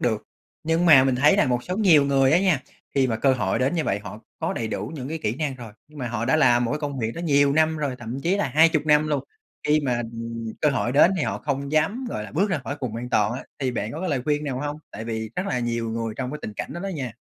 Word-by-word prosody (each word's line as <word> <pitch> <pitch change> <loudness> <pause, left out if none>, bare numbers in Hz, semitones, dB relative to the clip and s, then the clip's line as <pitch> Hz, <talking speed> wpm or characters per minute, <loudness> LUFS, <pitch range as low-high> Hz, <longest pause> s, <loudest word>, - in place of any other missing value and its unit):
được. 110 -3 0 0.4
Nhưng 165 +2 +1
mà 140 -6 +8
mình 135 -1 +2
thấy 150 +8 +5
là 205 - +3
một 125 -1 0
số 180 - -3
nhiều 175 -9 +5
người 135 -1 +3
á 170 - +6
nha, 185 -8 +2 0.3
khi 135 -1 +3
mà 115 -3 -1
cơ 135 +4 +3
hội 105 -5 0
đến 130 +6 +1
như 165 -3 0
vậy 100 - 0
họ 105 +1 -9 0.2
có - - -1
đầy 115 - -3
đủ 110 - -4
những 135 -3 -6
cái 160 +2 -3
kỹ 105 - 0
năng 145 -3 -2
rồi, 115 -4 -10 0.2
nhưng 150 - -14
mà 125 -3 -3
họ 115 -1 -2
đã 135 +6 +3
làm 120 -5 +4
một 120 - -1
cái - - -1
công 145 -3 -4
việc 115 -2 -1
đó 170 - -5
nhiều 145 -4 +3
năm 160 +1 +2
rồi, 145 -4 -2
thậm 120 +3 -6
chí 180 +6 +2
là 205 - 0
20 155 +3 +4
năm 150 0 +4
luôn. 145 -2 -1 0.4
Khi 150 +1 +4
mà, 130 -4 0 0.2
ừm, 115 -1 -5
cơ 150 - +3
hội 125 -3 -1
đến 150 +6 +6
thì - - 0
họ - - -2
không 140 -1 -3
dám 160 +12 +1
gọi 105 - -4
là - - -9
bước 195 +7 +1
ra 185 - +1
khỏi 140 - -4
vùng 120 -4 -3
an 120 +1 -5
toàn 105 -2 +2
á, 125 - -5 0.2
thì 130 -2 -1
bạn 115 -2 -3
có 155 - -6
cái 185 - -2
lời 135 -4 -1
khuyên 150 +1 0
nào 135 -3 -3
hông? 145 +1 -3
Tại 110 - -7
vì 110 -1 -4
rất 185 - -1
là 125 - -1
nhiều 115 -1 -2
người 115 -1 -3
trong 130 -1 -3
cái 150 - -5
tình 110 - -5
cảnh - - -5
đó 170 - -6
đó 195 - -4
nha. 135 - -4
135 Hz, 300 wpm, -24 LUFS, 120-155 Hz, 0.4 s, mà